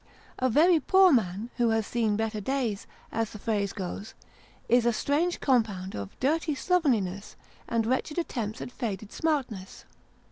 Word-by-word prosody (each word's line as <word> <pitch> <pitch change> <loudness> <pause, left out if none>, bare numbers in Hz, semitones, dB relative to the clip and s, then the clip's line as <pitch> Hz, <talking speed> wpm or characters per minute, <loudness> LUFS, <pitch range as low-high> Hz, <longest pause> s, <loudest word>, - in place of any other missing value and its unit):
A 255 - +2
very 325 +7 +5
poor 380 +2 +5
man, 215 - 0
" - - -29
who 240 -2 +3
has 225 -1 +1
seen 225 -3 0
better 220 0 -2
days," 235 -3 -2 0.2
as 225 -1 -1
the - - -9
phrase 205 -2 -1
goes, 200 +2 -6 0.5
is 240 0 +4
a 235 - +3
strange 310 +9 0
compound 215 -8 +1
of 100 -1 -7
dirty 310 +3 +1
slovenliness 235 - 0 0.3
and 230 -1 +1
wretched 260 +6 -1
attempts 230 -11 -3
at - - -6
faded 215 -5 -4
smartness. 260 -12 -2
230 Hz, 155 wpm, -28 LUFS, 210-275 Hz, 0.5 s, very